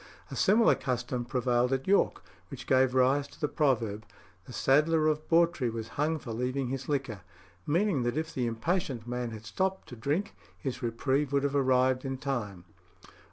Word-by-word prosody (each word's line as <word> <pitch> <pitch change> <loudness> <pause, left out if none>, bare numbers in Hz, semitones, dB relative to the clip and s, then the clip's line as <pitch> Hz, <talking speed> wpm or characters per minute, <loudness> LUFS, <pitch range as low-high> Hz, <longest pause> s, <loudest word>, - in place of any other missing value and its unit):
A - - -5
similar 220 +3 +4
custom 125 -1 -2
prevailed 125 -1 +1
at 135 0 -1
York, 200 +1 +2 0.3
which 130 -3 -8
gave 130 -1 +3
rise 135 +2 +3
to - - -18
the 150 - 0
proverb, 115 -9 0 0.4
"The - - -11
saddler 155 +5 +3
of 155 0 0
Bawtry 165 -6 +3
was 115 0 -5
hung 155 +3 0
for 130 -6 -8
leaving 125 +2 -2
his 135 +1 -4
liquor," 135 -8 -2 0.5
meaning 170 -1 +2
that 120 +3 -1
if 160 +1 -3
the 125 -2 -1
impatient 125 - -2
man 125 0 -3
had 110 -1 -9
stopped 190 - -2
to 125 - -8
drink, 145 - -2 0.2
his 130 -2 -5
reprieve 130 +4 0
would 140 -1 +1
have 140 0 0
arrived 130 -1 +3
in 135 -1 -3
time. 115 -10 -4
130 Hz, 175 wpm, -29 LUFS, 120-150 Hz, 0.5 s, similar